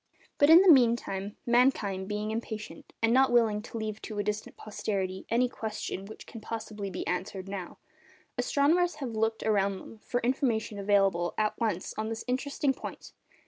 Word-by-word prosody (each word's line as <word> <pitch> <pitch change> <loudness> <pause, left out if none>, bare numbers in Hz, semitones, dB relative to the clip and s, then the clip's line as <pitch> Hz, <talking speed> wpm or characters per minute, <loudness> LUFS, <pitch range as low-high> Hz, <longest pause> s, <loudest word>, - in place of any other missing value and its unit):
But 285 - +6
in 335 +3 +9
the 375 - +8
meantime, 230 -6 +1
mankind 235 -6 +2
being 210 +1 -2
impatient, 220 -1 -6
and 225 +1 +4
not 265 0 +5
willing 225 -3 +3
to 230 - -8
leave 220 -1 -4
to 215 - -7
a 205 - 0
distant 210 +1 -4
posterity 195 -3 -3
any 240 +2 +3
question 220 -4 -5
which 220 - -11
can 225 - -10
possibly 215 -3 -5
be 185 - -5
answered 185 +1 -3
now, 195 -3 -6 0.6
astronomers 330 +5 +2
have 270 -5 -5
looked 225 0 -1
around 200 -2 +1
them 220 - -12
for 245 - -2
information 235 -4 0
available 195 -4 +2
at 215 -1 +1
once 210 -6 -1
on 220 0 -2
this 225 0 -5
interesting 270 +2 0
point. - - -9
220 Hz, 170 wpm, -29 LUFS, 200-240 Hz, 0.6 s, in